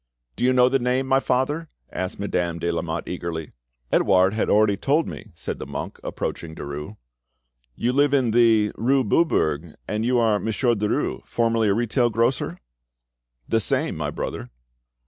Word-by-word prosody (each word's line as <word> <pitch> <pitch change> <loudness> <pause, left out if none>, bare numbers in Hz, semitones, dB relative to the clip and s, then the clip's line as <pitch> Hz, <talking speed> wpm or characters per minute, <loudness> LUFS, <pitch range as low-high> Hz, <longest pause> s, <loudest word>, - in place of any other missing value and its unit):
"Do - - -4
you 130 - +4
know 125 -1 +5
the 135 +1 +2
name, 125 +2 0
my 135 0 +3
father?" 145 +5 -1 0.2
asked 95 +1 -4
Madame 90 -4 -1
de 85 +1 -1
Lamotte 85 0 -3
eagerly. 85 -3 -4 0.4
"Edouard 95 0 +4
had 110 - 0
already 105 -1 +4
told 145 +10 +1
me," 110 - -8
said - - -5
the - - -6
monk, - - -6
approaching 80 -1 -4
Derues. 75 +9 -7 0.8
"You 120 +2 0
live 145 +1 +3
in 130 -5 +2
the, 110 -2 +4
rue 130 +4 +2
Beaubourg, 85 - +1
and 105 +1 -1
you 125 +1 +2
are 110 -3 +3
Monsieur 120 +3 +1
Derues, 105 -1 -1
formerly 115 -2 +1
a 100 - +2
retail 120 +2 +1
grocer?" 115 -5 0 0.9
"The 115 - +2
same, - - 0
my - - -2
brother." - - -5
110 Hz, 165 wpm, -23 LUFS, 95-125 Hz, 0.9 s, know